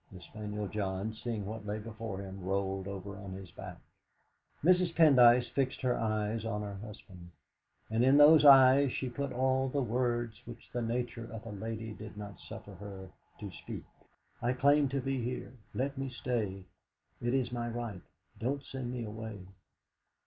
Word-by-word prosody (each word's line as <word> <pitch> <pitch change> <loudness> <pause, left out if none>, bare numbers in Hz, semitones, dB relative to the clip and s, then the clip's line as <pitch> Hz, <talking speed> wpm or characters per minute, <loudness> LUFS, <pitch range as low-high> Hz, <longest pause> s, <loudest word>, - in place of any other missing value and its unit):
The 95 - -10
spaniel 105 +2 -5
John, 100 +1 -2
seeing 110 -2 -4
what 105 0 -6
lay 105 +1 -2
before 110 -2 -6
him, 95 -1 -8
rolled 95 0 -1
over 100 0 -6
on 95 -2 -7
his 95 -1 -9
back. - - -9 0.9
Mrs. 180 0 +4
Pendyce 125 -6 +7
fixed 135 -2 -1
her 125 -2 +2
eyes 110 0 -1
on 105 -2 -2
her 100 -1 -5
husband, 95 -4 -11 0.6
and 110 +2 +1
in 135 +2 +6
those 150 +1 +8
eyes 135 -1 +8
she 130 - -2
put 140 +2 -3
all 130 +1 +1
the 140 +1 0
words 120 -2 -1
which 120 -1 -11
the 120 - -1
nature 120 0 -3
of 115 0 -8
a 115 - -6
lady 110 +1 -5
did 110 0 -10
not 105 -1 -8
suffer 100 - -10
her 95 0 -9 0.3
to 105 -4 -6
speak. 80 - -8 0.4
'. 120 +1 -2
claim 145 0 +5
to 135 0 -1
be 135 0 -1
here. 125 +1 -4 0.2
Let 135 +1 -1
me 135 0 -2
stay; 115 -6 -2 0.6
it 120 +2 +1
is 125 -3 0
my 120 -1 -2
right. 115 -6 -4 0.4
Don't 140 +4 -1
send 130 -2 -5
me 125 -2 -3
away.' 105 -2 -7
115 Hz, 170 wpm, -32 LUFS, 105-130 Hz, 0.9 s, those